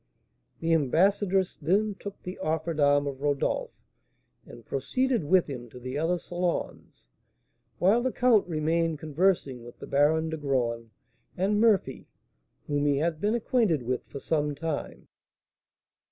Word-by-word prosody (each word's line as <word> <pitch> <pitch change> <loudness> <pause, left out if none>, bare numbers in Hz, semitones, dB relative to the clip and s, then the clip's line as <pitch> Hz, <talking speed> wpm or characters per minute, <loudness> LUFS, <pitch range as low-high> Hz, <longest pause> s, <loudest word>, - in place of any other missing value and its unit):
The 165 0 +1
ambassadress 185 +5 +2
then 200 +7 +1
took 200 0 -9
the 180 +1 -7
offered 160 -1 -2
arm 145 0 +4
of 140 -1 -5
Rodolph, 145 -2 0 0.8
and 120 - -13
proceeded 250 - -1
with 180 +3 +4
him 125 -4 -7
to 125 - -11
the 130 +2 -6
other 170 +3 +1
salons, 175 - -4 0.7
while 200 +7 +3
the 260 +1 0
count 240 -6 +3
remained 165 0 0
conversing 155 -5 0
with 120 - -12
the - - -9
Baron 160 +3 +2
de 160 - -3
Graün 120 -5 -1 0.5
and 205 +3 +1
Murphy, 220 -4 +2 0.6
whom 145 0 0
he 140 -1 +2
had 160 +1 -1
been 210 +3 +1
acquainted 220 - +1
with 125 +1 -2
for - - -8
some 150 0 -1
time. 155 0 -5
160 Hz, 140 wpm, -27 LUFS, 145-190 Hz, 0.8 s, arm